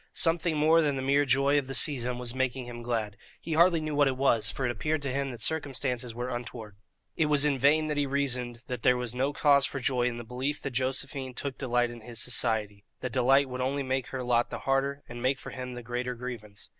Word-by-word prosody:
Something 165 -1 +2
more 160 +2 +5
than 145 -3 +1
the 130 - -3
mere 140 +2 +3
joy 140 +2 +3
of 135 - -6
the 135 - -4
season 125 -3 +2
was 125 -1 -2
making 130 -1 -1
him 120 -1 -8
glad; 110 -4 -2 0.2
he 165 - -4
hardly 170 +1 +5
knew 155 -1 -3
what 145 -1 +4
it 130 -1 -1
was, 130 -5 +2
for 135 - -3
it 120 - +1
appeared 145 +6 -1
to 140 - -1
him 140 0 -1
that 120 -3 -3
circumstances 130 -6 -1
were 125 +1 -3
untoward. 115 -3 -7 0.4
It 155 - +2
was 145 -1 +4
in 140 -3 +1
vain 150 +4 +4
that 150 -1 -2
he 145 -1 +1
reasoned 125 -4 -2
that 125 -2 -5
there 125 +2 +4
was 125 -1 -2
no 130 +3 0
cause 140 -1 +4
for 140 - -5
joy 125 -1 +1
in 120 -1 -3
the 120 - -6
belief 130 +5 -3
that 140 - -3
Josephine 130 +1 -2
took 135 -1 -5
delight 120 -2 +1
in 120 -1 -10
his 115 0 -8
society; 110 -4 -1 0.2
that 125 - -3
delight 135 +3 +4
would 125 0 -5
only 140 +2 -1
make 130 -1 -1
her 130 -1 -4
lot 120 -1 +2
the - - -6
harder, 135 +1 0
and 120 0 -8
make 130 +2 +1
for - - -9
him 125 -1 -6
the 120 - -7
greater 125 +1 -3
grievance. 115 -4 -8
130 Hz, 245 wpm, -28 LUFS, 120-140 Hz, 0.4 s, more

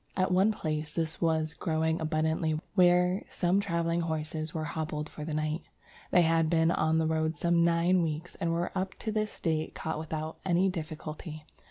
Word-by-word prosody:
At 185 0 +2
one 190 +4 +4
place 155 -6 -3
this 160 -2 -2
was 160 -2 +1
growing 160 0 0
abundantly 155 0 0
where 180 0 +4
some 180 +2 +1
travelling 170 -3 0
horses 155 -1 -3
were 160 -2 -3
hobbled 150 0 -3
for 150 - -8
the 150 0 -3
night. 155 +2 -1 0.5
"They 175 - +5
had 165 -1 +3
been 165 0 +3
on 160 -1 +2
the 160 - +2
road 160 0 0
some 170 +1 +3
nine 170 +2 +3
weeks, 160 +1 -3
and 170 -3 -2
were 170 +2 -1
up 190 0 -2
to 220 - -4
this 215 0 -2
date 160 -2 -1
caught 160 -1 -3
without 155 0 -4
any 185 +1 +3
difficulty. 155 -2 -6
160 Hz, 180 wpm, -30 LUFS, 155-175 Hz, 0.5 s, They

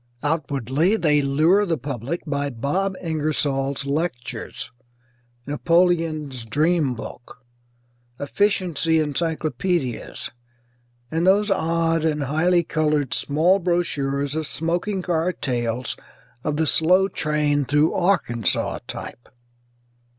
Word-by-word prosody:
Outwardly 145 - +1
they 150 -8 +3
lure 155 +9 +3
the 170 -5 0
public 135 +4 -4
by 145 -2 -1
Bob 160 +11 -1
Ingersoll's 145 -4 -1
lectures, 140 -6 -3 0.7
Napoleon's 160 -4 +1
Dream 150 +2 +1
Book, 120 +1 -10 0.7
efficiency 165 -1 +1
encyclopædias 155 - -2 0.8
and 165 +3 +1
those 205 +2 +4
odd 165 -2 +1
and 150 -2 0
highly 170 +5 +2
coloured 150 -4 0
small 165 +7 +2
brochures 145 -6 -1
of 155 -1 -2
smoking 175 +4 -1
car 175 0 0
tales 120 -3 -2 0.5
of 150 -1 -1
the 160 - +2
Slow 180 +6 +4
Train 150 -4 +1
Through 150 +4 +3
Arkansaw 165 - +1
type. 120 - -8
155 Hz, 100 wpm, -23 LUFS, 140-175 Hz, 0.8 s, those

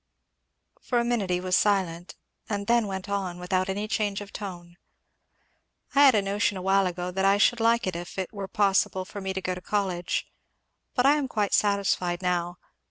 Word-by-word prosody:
For 245 - -1
a 235 - +2
minute 235 -6 0
he 180 0 +1
was 185 0 0
silent, 185 -4 0 0.3
and 200 -1 -2
then 235 -1 +2
went 190 -1 -5
on, 195 -3 -2
without 185 +1 -1
any 205 +2 -2
change 205 -2 -1
of 205 -1 -10
tone. 175 -4 -8 1.2
"I 285 +1 +7
had 265 -4 +6
a 205 - +2
notion 200 0 0
awhile 195 +1 +2
ago 180 0 -4
that 190 +1 -2
I 195 +1 +4
should 240 +3 +3
like 230 +1 +3
it 185 -2 -2
if 175 +2 -7
it 190 +2 -4
were 200 -2 -5
possible 195 -2 +1
for 200 +2 -8
me 190 0 -3
to 190 0 -3
go 185 - -1
to 180 - -7
college; 185 -4 -1 0.7
but 250 - +2
I 290 +2 +5
am 285 -3 -1
quite 210 -5 -1
satisfied 190 -3 +1
now. 175 -1 -1
195 Hz, 195 wpm, -26 LUFS, 180-210 Hz, 1.2 s, I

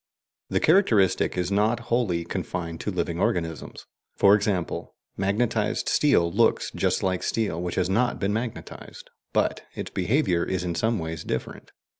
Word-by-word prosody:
The - - +1
characteristic 115 - +3
is 90 +1 -1
not 110 +4 +2
wholly 95 -9 +1
confined 85 -2 -4
to - - -3
living 85 -3 -2
organisms. 80 -4 -2 0.3
For 100 0 +6
example, 100 -4 -1 0.2
magnetized 105 +2 0
steel 85 - +3
looks - - +2
just - - 0
like 95 -1 0
steel 100 -7 -1
which 90 -1 -3
has 90 - +1
not 120 +6 +1
been 100 +1 0
magnetized, 115 +1 -6 0.2
but - - 0
its - - -5
behaviour 95 - +1
is 95 -1 -2
in 90 -1 -2
some 110 +5 0
ways 80 -2 -5
different. - - -5
95 Hz, 150 wpm, -25 LUFS, 85-110 Hz, 0.3 s, For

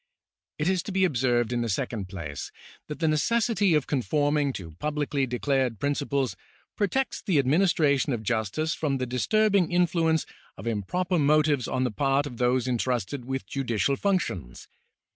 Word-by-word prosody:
It 150 - -1
is 185 -1 +2
to 200 - -7
be 190 0 +3
observed 120 -6 +1
in 120 - 0
the 115 - -2
second 100 -1 -2
place 85 -7 -6 0.4
that 150 - -6
the 165 - 0
necessity 205 +4 +2
of 150 - +1
conforming 145 +1 +1
to 85 -7 -7
publicly 145 0 -1
declared 125 -1 0
principles 140 -2 -1 0.4
protects 260 +6 -1
the 185 -8 +1
administration 145 -1 +3
of 115 -3 -2
justice 115 +8 -1
from 140 -3 -1
the 130 - -2
disturbing 195 - +2
influence 165 -2 +2 0.3
of 95 - -9
improper 170 - -1
motives 150 -3 +3
on 130 0 -1
the 125 - 0
part 135 +4 +1
of 125 -5 -7
those 125 +1 +1
entrusted 125 0 -1
with 135 +1 -3
judi 135 -4 -3
cial 140 +6 +2
functions. 145 - -2
140 Hz, 160 wpm, -26 LUFS, 120-160 Hz, 0.4 s, be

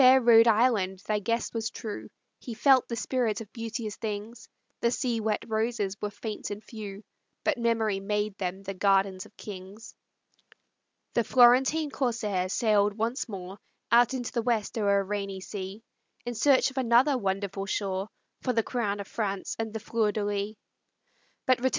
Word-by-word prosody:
O - - +6
fair 260 +1 +8
Rhode 230 -2 +7
Island, 215 -4 +3
thy 215 -1 +1
guest 230 +3 -1
was 225 -1 -2
true, 215 -2 -7 0.3
He 235 - -7
felt 260 +2 +5
the 235 - -3
spirit 240 -2 0
of 220 -3 -10
beauteous 230 -2 -4
things; 220 +1 -5 0.3
The 235 - +2
sea 240 -1 -1
wet 215 -1 -1
roses 220 -3 -1
were 210 - -1
faint 210 +1 -6
and 205 +1 -6
few, 210 -2 -8 0.4
But 300 -5 +1
memory 225 -4 +1
made 210 +1 -1
them 190 +1 -3
the 195 0 -4
gardens 195 -1 +2
of - - -27
kings. 200 +2 -9 1.2
The 235 - +2
Florentine 260 +6 +5
corsair 220 -9 -1
sailed 210 -1 +2
once 235 +4 -1
more, 190 -1 -7 0.3
Out 240 +2 +5
into 245 -2 -3
the 235 - 0
West 225 -3 0
o'er 200 -3 +3
a - - -3
rainy 195 -1 -3
sea, 195 +2 -7 0.4
In 240 - -3
search 270 +3 +4
of 265 - -3
another 255 +3 +4
wonderful 195 -3 -2
shore 195 0 -2 0.3
For 250 - 0
the 225 -1 +2
crown 210 -5 -2
of 200 - -9
France 200 -4 -3
and 225 -1 -2
the 220 - -4
Fleur 220 0 0
de 205 0 -2
lis. 205 +1 -2
215 Hz, 170 wpm, -28 LUFS, 200-235 Hz, 1.2 s, fair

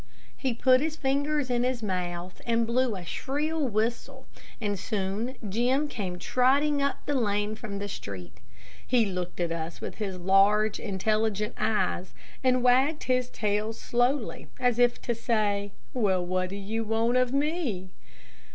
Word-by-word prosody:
He 260 -4 -1
put 255 +2 +5
his 310 0 -1
fingers 285 -1 0
in 240 -1 +2
his 250 -2 -1
mouth 180 -2 -3
and 230 0 +2
blew 240 -1 +1
a 180 -2 -7
shrill 295 - -1
whistle, 235 +4 -2 0.3
and 205 -3 -1
soon 215 +4 -2
Jim 250 +8 +1
came 190 -9 -4
trotting 280 +8 +2
up 280 0 -1
the 290 - 0
lane 210 -4 +1
from 215 -2 -6
the 200 0 -4
street. 100 - -7 0.5
He 240 -3 +4
looked 180 -3 -4
at 170 -1 0
us 165 0 -4
with - - -6
his 195 -3 -3
large, 195 +4 +4
intelligent 215 +1 0
eyes, 210 -4 0 0.3
and 255 -1 +3
wagged 265 +5 +4
his 255 -1 +1
tail 210 0 -1
slowly, 245 +2 0
as 245 -2 +2
if 245 0 +4
to 240 - 0
say, 210 -4 0 0.2
"Well, 190 -7 +1
what 185 0 0
do 195 - -5
you 215 +3 -3
want 225 +3 +1
of 255 -1 +2
me?" 275 - -1
225 Hz, 155 wpm, -28 LUFS, 200-255 Hz, 0.5 s, put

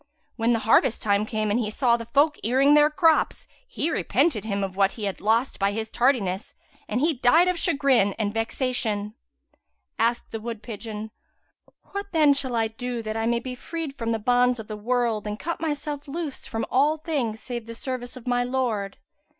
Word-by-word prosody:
When 230 0 +2
harvest 225 +1 +3
time 205 0 +2
came 215 -2 -1
and 220 - +2
he 220 -3 -1
saw 235 +2 +2
the 230 -1 -6
folk 290 +5 +2
earing 265 +5 +4
their 295 0 +6
crops, 320 +1 +2 0.2
he 325 - -2
repented 270 - +1
him 200 -2 -1
of 190 -1 -4
what 195 0 +2
he 220 - -8
had 195 -2 -3
lost 225 +5 +1
by 200 0 +1
his 220 +1 -4
tardiness 225 -7 0 0.3
and 215 - -1
he 320 +2 +3
died 295 +7 +4
of 365 -2 0
chagrin 260 -10 +3
and 205 -2 -1
vexation." 225 -3 -1 0.9
Asked 235 +2 0
the 225 - -4
wood 230 0 -6
pigeon, 220 -1 -6 0.8
"What 400 -1 -5
then 305 -3 +5
shall 260 -3 -2
I 225 -1 +2
do 240 +1 -5
that 215 0 -4
I 225 0 0
may 235 0 +2
be 255 +1 -6
freed 315 +2 -6
from 230 -3 -2
the 225 - +1
bonds 245 +2 +2
of 220 - -7
the 215 - -5
world 230 -1 0
and 210 0 -3
cut 335 +7 -4
myself 295 -2 -3
loose 305 -1 -5
from 225 0 -3
all 290 +5 +3
things 280 -9 -2
save 240 -2 -6
the 230 - -7
service 250 0 -5
of 250 - -12
my 245 -1 +1
Lord?" 240 -6 -2
240 Hz, 195 wpm, -25 LUFS, 220-275 Hz, 0.9 s, their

